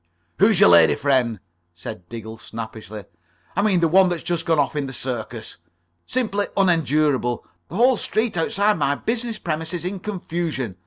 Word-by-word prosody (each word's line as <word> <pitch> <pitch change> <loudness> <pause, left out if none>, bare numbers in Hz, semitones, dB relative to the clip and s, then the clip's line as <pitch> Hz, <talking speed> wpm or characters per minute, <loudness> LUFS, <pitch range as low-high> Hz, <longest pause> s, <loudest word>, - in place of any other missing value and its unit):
"Who's 205 -1 +5
your - - +7
lady 85 -2 +6
friend?" 125 -6 +1 0.4
said 85 0 -9
Diggle, 110 -1 -8
snappishly. 110 -2 -8 0.5
"I - - +2
mean 195 -4 +2
the 165 - +4
one 185 +3 +5
that's 175 -2 -3
just 175 -1 -2
gone 165 -1 +3
off 145 +1 +1
in 145 -2 -1
the 135 - -7
circus. 120 -3 -5 0.5
Simply 210 -5 -1
unendurable. 150 - +2 0.2
The 165 - -9
whole 245 +3 +4
street 220 +1 -1
outside 205 +3 +1
my 140 0 +1
business 230 +5 -2
premises 160 +1 -4
in 190 +1 -3
confusion. 170 - -4
160 Hz, 160 wpm, -22 LUFS, 120-195 Hz, 0.5 s, your